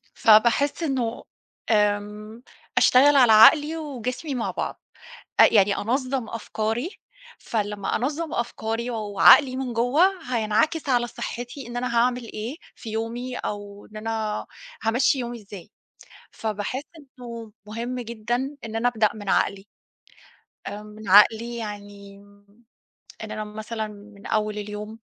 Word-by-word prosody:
...فباحس 235 Hz, +8 st, +4 dB
إنه 255 Hz, -6 st, -2 dB, 0.5 s
آمم، 210 Hz, +2 st, 0 dB, 0.3 s
أشتغل 280 Hz, +3 st, +6 dB
على 245 Hz, -4 st, +6 dB
عقلي 300 Hz, +8 st, +7 dB
وجسمي 265 Hz, -1 st, -4 dB
مع 235 Hz, -, -2 dB
بعض -, -, -5 dB, 0.6 s
أ -, -, +10 dB
يعني 200 Hz, -1 st, +4 dB
أنظّم 255 Hz, +1 st, -1 dB
أفكاري 230 Hz, -, -3 dB, 0.5 s
فلمّا 205 Hz, -3 st, -2 dB
أنظّم 300 Hz, +6 st, -2 dB
أفكاري 235 Hz, 0 st, -3 dB
و 230 Hz, -, -3 dB, 0.2 s
وعقلي 255 Hz, +5 st, +7 dB
من 260 Hz, -2 st, -3 dB
جوّا 245 Hz, +9 st, +3 dB, 0.3 s
هينعكس 235 Hz, +8 st, +1 dB
على 240 Hz, -2 st, +2 dB
صحّتي، 245 Hz, +2 st, -7 dB
إن 240 Hz, -, -7 dB
أنا 245 Hz, -1 st, -2 dB
هاعمل 245 Hz, +1 st, +2 dB
إيه 225 Hz, +6 st, -6 dB, 0.2 s
في 225 Hz, -, -9 dB
يومي 235 Hz, +3 st, -4 dB
أو 205 Hz, 0 st, -6 dB
إن 215 Hz, -, -14 dB
أنا 220 Hz, -1 st, -3 dB, 0.4 s
هامشّي 250 Hz, +4 st, +2 dB
يومي 240 Hz, 0 st, -5 dB
إزاي، 200 Hz, -1 st, -11 dB, 0.6 s
فباحس 220 Hz, +5 st, -4 dB, 0.2 s
إنه 235 Hz, -5 st, -10 dB, 0.2 s
مهم 240 Hz, +3 st, -4 dB
جدًا 240 Hz, +4 st, -3 dB
إن 220 Hz, 0 st, -7 dB
أنا 235 Hz, +2 st, +1 dB
أبدأ 220 Hz, -3 st, +2 dB
من 205 Hz, -2 st, -7 dB
عقلي، 200 Hz, 0 st, 0 dB, 1.0 s
آآ، 205 Hz, +1 st, -6 dB
من 210 Hz, -1 st, -11 dB
عقلي 225 Hz, +4 st, +5 dB
يعني 205 Hz, -2 st, -8 dB
م 200 Hz, +3 st, -22 dB, 0.6 s
إن 215 Hz, -, -8 dB
أنا 215 Hz, 0 st, -4 dB
مثلًا 220 Hz, +1 st, -5 dB
من 205 Hz, 0 st, -13 dB
أول 215 Hz, -1 st, -1 dB
اليوم 210 Hz, +2 st, -7 dB
225 Hz, 130 wpm, -24 LUFS, 210-250 Hz, 1.0 s, أ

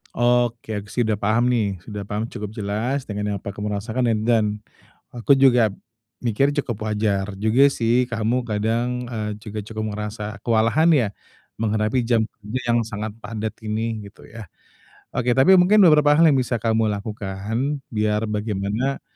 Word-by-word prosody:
Oke, 120 Hz, -2 st, +1 dB
aku 100 Hz, 0 st, -5 dB
sih 125 Hz, -, 0 dB
udah 110 Hz, -, +1 dB
paham 110 Hz, +4 st, +1 dB
nih, 105 Hz, -6 st, 0 dB
sudah 105 Hz, -2 st, -5 dB
paham 105 Hz, +3 st, -3 dB
cukup 105 Hz, -2 st, -7 dB
jelas, 110 Hz, +5 st, -2 dB
dengan 105 Hz, -1 st, -3 dB
apa -, -, -13 dB
kamu 105 Hz, 0 st, -3 dB
rasakan 115 Hz, +3 st, -1 dB
ed 110 Hz, -, 0 dB
dan, 105 Hz, -3 st, +2 dB, 0.5 s
aku 120 Hz, +3 st, +3 dB
juga 130 Hz, -4 st, +5 dB, 0.6 s
mikir, 130 Hz, +5 st, +1 dB
cukup 120 Hz, -7 st, -3 dB
wajar 105 Hz, -2 st, -1 dB
juga 110 Hz, +7 st, +4 dB
sih, 125 Hz, -2 st, +2 dB
kamu 120 Hz, +1 st, -1 dB
kadang, 115 Hz, +3 st, -1 dB
eee, 105 Hz, -2 st, -3 dB
juga 110 Hz, -1 st, -7 dB
cukup 110 Hz, 0 st, -5 dB
merasa 105 Hz, 0 st, -5 dB
kewalahan, 115 Hz, +8 st, +3 dB
ya, 120 Hz, -8 st, +2 dB, 0.5 s
menghadapi 110 Hz, +2 st, 0 dB
jam 115 Hz, -2 st, +3 dB, 0.2 s
kerja 110 Hz, +4 st, -5 dB
yang 115 Hz, -1 st, +2 dB
sangat 105 Hz, 0 st, -4 dB
padat 110 Hz, -1 st, -4 dB, 0.2 s
ini, 110 Hz, +1 st, -2 dB
gitu 100 Hz, -, -16 dB
ya? 115 Hz, -2 st, -10 dB, 0.7 s
Oke, 125 Hz, 0 st, +1 dB
tapi 135 Hz, +10 st, +6 dB
mungkin 195 Hz, +4 st, +5 dB
beberapa 150 Hz, -4 st, +6 dB
hal 165 Hz, +3 st, +5 dB
yang 140 Hz, -, +4 dB
bisa 120 Hz, -2 st, -1 dB
kamu 110 Hz, 0 st, +1 dB
lakukan 110 Hz, +6 st, -3 dB
biar 105 Hz, 0 st, 0 dB
bagaimana 105 Hz, +5 st, -2 dB
110 Hz, 160 wpm, -22 LUFS, 105-125 Hz, 0.7 s, tapi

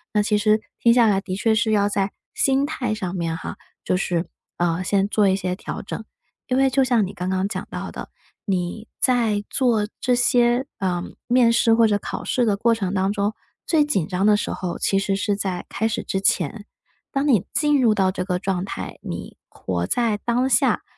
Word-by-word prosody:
那 210 Hz, -, +4 dB
其 210 Hz, 0 st, +1 dB
实 215 Hz, +1 st, +3 dB, 0.2 s
听 235 Hz, 0 st, +5 dB
下 240 Hz, -2 st, +5 dB
来 200 Hz, -2 st, +3 dB
的 185 Hz, -2 st, -4 dB
确 220 Hz, +2 st, +2 dB
是 220 Hz, 0 st, +1 dB
要 205 Hz, -1 st, +3 dB
在 200 Hz, -1 st, 0 dB, 0.2 s
心 270 Hz, +1 st, +2 dB
态 250 Hz, -8 st, -2 dB
上 190 Hz, -4 st, -4 dB
面 165 Hz, -2 st, -2 dB
哈， 165 Hz, -, -7 dB, 0.3 s
就 185 Hz, -, +1 dB
是， 175 Hz, -2 st, -1 dB, 0.3 s
呃， 175 Hz, +1 st, 0 dB
先 195 Hz, +1 st, +1 dB
做 205 Hz, 0 st, +2 dB
一 190 Hz, -, +3 dB
些 185 Hz, -1 st, -2 dB
调 -, -, -6 dB
整。 -, -, -6 dB, 0.4 s
因 255 Hz, -, 0 dB
为 270 Hz, 0 st, +4 dB
就 265 Hz, +1 st, +3 dB
像 240 Hz, -4 st, +2 dB
你 195 Hz, -, -8 dB
刚 180 Hz, +1 st, -3 dB
刚 190 Hz, +1 st, 0 dB
讲 190 Hz, -3 st, -5 dB
到 -, -, -5 dB
的， -, -, -8 dB, 0.4 s
你 190 Hz, +2 st, -2 dB
在 225 Hz, -5 st, +2 dB
做 230 Hz, -6 st, +1 dB
这 250 Hz, -1 st, +2 dB
些， 245 Hz, +1 st, +3 dB
呃， 180 Hz, -2 st, -1 dB, 0.2 s
面 245 Hz, -1 st, +4 dB
试 230 Hz, 0 st, +4 dB
或 225 Hz, -1 st, +5 dB
者 205 Hz, -1 st, +2 dB
考 -, -, -6 dB
试 245 Hz, -, +1 dB
的 210 Hz, -3 st, +2 dB
过 230 Hz, +2 st, +3 dB
程 195 Hz, -3 st, -3 dB
当 190 Hz, 0 st, +1 dB
中， 205 Hz, 0 st, -1 dB, 0.3 s
最 315 Hz, -3 st, +3 dB
紧 195 Hz, -, 0 dB
张 200 Hz, +3 st, +3 dB
时 -, -, -3 dB
候 180 Hz, -2 st, -4 dB
其 195 Hz, -, +1 dB
实 195 Hz, 0 st, 0 dB
是 205 Hz, +1 st, 0 dB
在 190 Hz, -3 st, -3 dB
开 220 Hz, +2 st, -1 dB
始 220 Hz, -, -3 dB
之 190 Hz, -, -2 dB
前。 195 Hz, +2 st, 0 dB, 0.5 s
当 275 Hz, +1 st, 0 dB
你 225 Hz, -, +3 dB
进 295 Hz, -2 st, +3 dB
入 225 Hz, -3 st, +4 dB
到 190 Hz, -2 st, +2 dB
这 185 Hz, -, -3 dB
个 180 Hz, -1 st, -1 dB
状 190 Hz, -1 st, -1 dB
态， -, -, -6 dB
你 -, -, -7 dB
活 90 Hz, -1 st, -3 dB
在 230 Hz, -4 st, +1 dB
当 240 Hz, +4 st, 0 dB
下、 240 Hz, -, +3 dB
210 Hz, 225 characters per minute, -22 LUFS, 190-235 Hz, 0.5 s, 听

